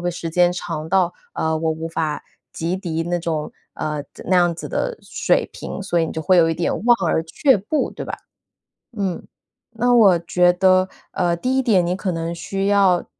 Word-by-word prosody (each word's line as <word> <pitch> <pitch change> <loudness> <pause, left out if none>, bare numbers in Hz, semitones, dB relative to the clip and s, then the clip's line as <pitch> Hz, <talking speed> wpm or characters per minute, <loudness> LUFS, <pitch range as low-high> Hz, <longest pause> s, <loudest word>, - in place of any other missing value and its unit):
会 175 0 -1
时 170 -1 -5
间 175 +1 +4
长 165 -3 -5
到， 180 -1 +2 0.2
呃， 160 0 0
我 160 0 0
无 160 +1 -4
法 160 -2 -3 0.3
及 170 +3 -3
抵 165 -4 -3
那 175 +1 -1
种 160 -3 -3 0.2
呃， 150 -1 -3 0.2
那 185 - +1
样 175 -1 +3
子 - - -7
的 - - -2
水 - - +1
平， - - -6
所 175 -3 0
以 165 - +1
你 - - -6
就 160 - -4
会 185 +3 +4
有 165 -1 +5
一 165 - 0
点 170 - -1
望 240 -1 +6
而 160 - +1
却 255 - +2
步， 220 +11 -1
对 - - -7
吧？ - - -4 0.8
嗯， 195 -4 -2 0.5
那 240 +2 +1
我 195 -7 +6
觉 175 +1 +3
得， 185 0 +3 0.2
呃， 175 -1 +1
第 255 +9 -1
一 265 - +2
点 205 -7 +3
你 180 - 0
可 190 -1 -2
能 165 0 -3
需 195 +3 -3
要， 195 -3 +3
175 Hz, 220 characters per minute, -21 LUFS, 165-195 Hz, 0.8 s, 望